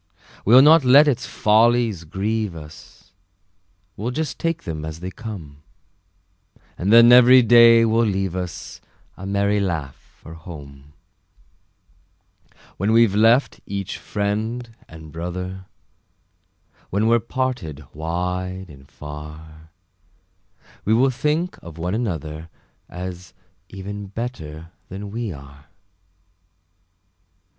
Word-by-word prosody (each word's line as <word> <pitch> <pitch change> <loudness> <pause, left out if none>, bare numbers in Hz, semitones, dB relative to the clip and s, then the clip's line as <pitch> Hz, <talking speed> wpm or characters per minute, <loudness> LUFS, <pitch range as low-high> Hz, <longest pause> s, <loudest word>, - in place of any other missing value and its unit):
We'll 125 +5 +7
not 155 +1 +7
let 140 +4 +7
its 135 -2 0
follies 110 -4 +2
grieve 100 +3 -2
us, 80 +4 -13 0.8
We'll 110 +5 -4
just 155 +4 -4
take 165 0 -2
them 80 -3 -5
as 80 +1 -6
they 90 +2 -6
come; 85 -11 -9 1.1
And 95 +4 -1
then 115 +1 +8
every 125 +1 +8
day 115 0 +7
will 115 +1 +2
leave 95 -3 -2
us 90 -2 -6 0.3
A 95 - -8
merry 100 +1 +1
laugh 80 -9 -3 0.2
for 80 - -12
home. 75 -4 -12 1.8
When 100 +4 0
we've 115 -3 +4
left 115 +6 +3
each 100 -1 -5
friend 110 +3 -3
and 80 -1 -12
brother, 90 +3 -6 1.2
When 105 +3 0
we're 115 +1 +4
parted 115 - -4
wide 90 +3 -4
and 70 -1 -16
far, 75 +1 -11 1.1
We 110 - +2
will 130 +3 +3
think 150 +7 -2
of 85 -2 -11
one 90 +3 -3
another, 80 - -4 0.4
As 90 0 -8 0.3
even 100 +1 -7
better 85 -8 -7 0.2
than 100 +2 -7
we 115 -1 -4
are. 70 -1 -13
95 Hz, 110 wpm, -21 LUFS, 80-115 Hz, 1.8 s, then